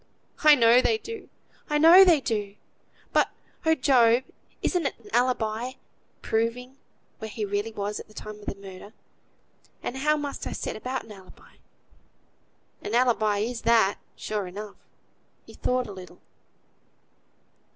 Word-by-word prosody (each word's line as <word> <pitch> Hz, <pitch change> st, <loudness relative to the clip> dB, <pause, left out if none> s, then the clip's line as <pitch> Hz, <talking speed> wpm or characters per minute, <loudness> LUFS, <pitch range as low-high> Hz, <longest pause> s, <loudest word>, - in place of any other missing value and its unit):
"I 305 Hz, -1 st, +9 dB
know 235 Hz, -1 st, +6 dB
they 440 Hz, -, +2 dB
do! 450 Hz, +1 st, -9 dB, 0.4 s
I 295 Hz, -, +2 dB
know 335 Hz, +5 st, +9 dB
they 345 Hz, -5 st, +5 dB
do! 210 Hz, -5 st, -3 dB, 0.6 s
But, -, -, +3 dB, 0.4 s
oh! 320 Hz, -, +5 dB
Job! 250 Hz, -3 st, +4 dB, 0.4 s
isn't 350 Hz, -6 st, +1 dB
an -, -, -4 dB, 0.2 s
alibi 245 Hz, -1 st, 0 dB
a -, -, -29 dB, 0.5 s
proving 240 Hz, +4 st, -2 dB, 0.4 s
where 220 Hz, -, -6 dB
he 210 Hz, 0 st, -4 dB
really 205 Hz, +2 st, -2 dB
was 205 Hz, -1 st, -4 dB
at -, -, -11 dB
th' 215 Hz, -, -19 dB
time 215 Hz, 0 st, -8 dB
of 205 Hz, -, -15 dB
the -, -, -3 dB
murder; 195 Hz, +1 st, -12 dB, 0.9 s
and 260 Hz, -, -4 dB
how 300 Hz, +3 st, +2 dB
must 290 Hz, -1 st, -5 dB
I -, -, -4 dB
set -, -, -4 dB
about 255 Hz, +4 st, -4 dB
an 220 Hz, -, -14 dB
alibi?" 190 Hz, -3 st, -16 dB, 1.2 s
"An -, -, -3 dB
alibi 220 Hz, -4 st, +2 dB
is 235 Hz, +2 st, -3 dB
that, 225 Hz, -4 st, +3 dB, 0.2 s
sure 210 Hz, -3 st, -4 dB
enough." 205 Hz, +3 st, -8 dB, 0.7 s
He -, -, -14 dB
thought 250 Hz, 0 st, -1 dB
a 210 Hz, -, -8 dB
little. 185 Hz, -2 st, -11 dB
230 Hz, 150 wpm, -26 LUFS, 210-265 Hz, 1.2 s, I